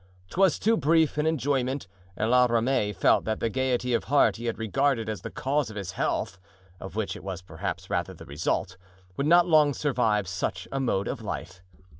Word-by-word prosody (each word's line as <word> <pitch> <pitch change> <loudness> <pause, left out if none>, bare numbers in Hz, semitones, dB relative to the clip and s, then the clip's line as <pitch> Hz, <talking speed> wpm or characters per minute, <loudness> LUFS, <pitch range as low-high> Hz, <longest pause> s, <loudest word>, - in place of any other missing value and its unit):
'Twas 190 -2 +3
too 225 +2 +2
brief 160 -1 +2
an 150 - +1
enjoyment, 135 -5 0 0.3
and 110 +2 0
La 125 0 +6
Ramee 115 -2 +1
felt 95 - +3
that 110 0 -1
the 115 - -1
gayety 125 -1 0
of 115 - 0
heart 145 -3 +3
he 120 - -7
had 115 - -2
regarded 115 +1 0
as 110 -1 -4
the 115 - -6
cause 140 +2 -1
of 105 - -9
health 90 -1 -2 0.4
(of 95 - -9
which 110 -2 -2
it - - -10
was 95 -1 -6
perhaps - - -5
rather - - -2
the - - -12
result) 75 +5 -2 0.4
would 140 - -1
not 175 +1 +6
long 155 -5 +4
survive 115 -9 +1
such 95 0 -3
a 135 - -2
mode 100 -7 0
of - - -4
life. 90 +1 -6
125 Hz, 195 wpm, -27 LUFS, 105-145 Hz, 0.4 s, La